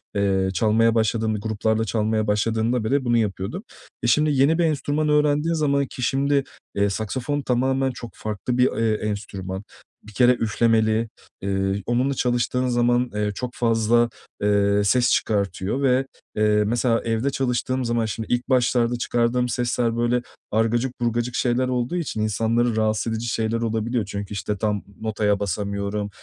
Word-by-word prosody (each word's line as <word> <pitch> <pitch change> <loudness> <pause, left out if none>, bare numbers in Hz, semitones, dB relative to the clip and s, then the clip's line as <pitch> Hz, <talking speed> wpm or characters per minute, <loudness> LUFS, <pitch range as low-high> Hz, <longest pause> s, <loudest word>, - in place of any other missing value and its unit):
eee, 95 -1 +1
çalmaya 110 +4 +3
başladığım 110 0 +1
b 105 - -3
gruplarla 110 +1 0
çalmaya 110 0 0
başladığımda 110 +3 +1
bile 135 +4 0
bunu 120 -1 +3
yapıyordum. 100 -3 -2 0.4
E, - - +1
şimdi 150 +5 +3
yeni 140 +4 +3
bir 175 - +2
enstrüman 150 0 0
öğrendiğin 150 +2 +2
zaman 140 -3 +1
ki 125 - -9
şimdi, 140 +2 +1 0.3
eee, 100 0 +2
saksafon 125 +8 -2
tamamen 130 +1 +1
çok 120 -2 -9
farklı 110 +3 -3
bir, 125 +1 +4
eee, 115 -1 +1 0.2
enstrüman. 95 -2 -5 0.4
Bir 105 - -14
kere 120 +5 +5
üflemeli, 110 -1 +1 0.3
eee, 95 0 -1
onunla 125 +3 +1
çalıştığın 125 0 0
zaman, 120 0 +2
eee, 105 0 0
çok 125 +2 -5
fazla, 115 0 +2 0.3
eee, 100 0 +3
ses 120 +4 +3
çıkartıyor 100 +4 0
ve, 130 0 +3 0.3
eee, 105 0 +3
mesela, 115 +1 +1
evde 115 +4 0
çalıştığım 130 -1 -1
zaman 115 -1 0
şimdi 110 +2 -3
ilk 120 0 -1
başlarda 120 -2 +2
çıkardığım 120 +1 0
sesler 120 -1 0
böyle 120 +1 +1 0.3
argacık 115 +4 0
burgacık 120 +1 -1
şeyler 125 +1 +1
olduğu 125 +5 -1
için 150 -10 -2
insanları 115 +2 +1
rahatsız 110 +1 0
edici 115 +1 -3
şeyler 115 0 -1
olabiliyor. 115 0 -1
Çünkü, 100 0 -6
işte, 105 0 -3
tam 105 -1 -1 0.2
notaya 105 -2 0
basamıyorum, 100 +1 -2
115 Hz, 155 wpm, -23 LUFS, 105-125 Hz, 0.4 s, kere